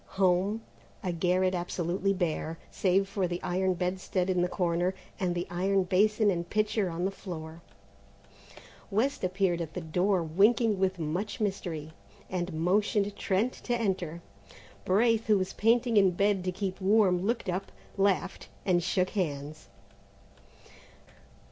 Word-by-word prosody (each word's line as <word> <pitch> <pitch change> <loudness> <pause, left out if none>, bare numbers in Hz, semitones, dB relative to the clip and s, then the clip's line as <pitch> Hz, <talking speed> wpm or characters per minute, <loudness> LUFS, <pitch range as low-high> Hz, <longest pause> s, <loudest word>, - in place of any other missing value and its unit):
Home? 195 +4 +2 0.4
A 185 - -1
garret 180 +2 +1
absolutely 180 +2 -1
bare, 165 -3 -2
save 195 +1 +2
for 195 -2 -1
the 175 0 -3
iron 185 +1 0
bedstead 185 +1 -1
in 180 -1 +1
the 180 - +2
corner 180 0 0 0.2
and 180 -2 0
the 175 - -2
iron 190 +2 +1
basin 210 +3 +3
and 170 -1 -3
pitcher 215 -2 +1
on 170 +2 -2
the 195 - 0
floor. 165 -4 -8 1.3
West 230 +7 0
appeared 185 -2 +1
at 160 -1 -6
the - - -2
door, 180 +3 +1
winking 205 +6 +3
with 190 0 +1
much 170 +6 -3
mystery, 175 -7 -3 0.4
and 180 -1 -2
motioned 200 +5 +1
Trent 205 +6 0
to 240 - -3
enter. 180 -6 -2 0.6
Braith, 225 +3 +3
who 210 -2 +5
was 185 0 -2
painting 230 +1 +2
in 195 -2 +6
bed 195 +1 +1
to 185 - 0
keep 190 0 -4
warm, 190 -2 +4
looked 230 +2 -1
up, 185 +2 -3 0.2
laughed, 195 -1 0 0.2
and 180 -2 +3
shook 180 +2 0
hands. 150 - -3
185 Hz, 140 wpm, -29 LUFS, 175-200 Hz, 1.3 s, in